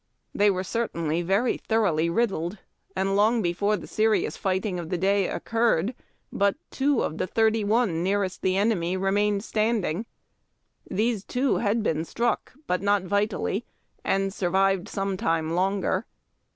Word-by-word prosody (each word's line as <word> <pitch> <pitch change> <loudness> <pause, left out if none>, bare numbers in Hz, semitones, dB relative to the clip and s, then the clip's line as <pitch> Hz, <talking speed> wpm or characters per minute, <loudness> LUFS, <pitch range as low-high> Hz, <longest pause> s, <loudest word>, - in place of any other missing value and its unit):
They 205 +1 +4
were 185 -1 0
certainly 170 -7 -1
very 195 +8 +1
thoroughly 180 -8 +1
riddled, 185 -2 0 0.4
and 195 +1 0
long 220 +2 +3
before 200 +5 +1
the - - -9
serious 220 0 +1
fighting 190 -1 -1
of 165 -2 -6
the 180 - -1
day 195 +1 +2
occurred 230 -3 0 0.4
but 200 0 +2 0.2
two 275 -2 +1
of 160 - -3
the - - 0
thirty 220 +2 +2
one 205 -5 +1
nearest 195 0 -1
the 185 0 +1
enemy 190 -4 +1
re 195 +1 0
mained 205 0 +1
standing. 215 -3 0 0.8
These 215 0 0
two 260 +4 0
had 215 +1 +1
been 160 -5 0
struck 235 +8 -1
but 180 -6 0
not 200 -1 +2
vitally, 205 +2 -1 0.4
and 195 0 0
survived 195 +1 +1
some 195 -1 -2
time 165 -2 0
longer. 190 +3 0
200 Hz, 150 wpm, -26 LUFS, 180-220 Hz, 0.8 s, They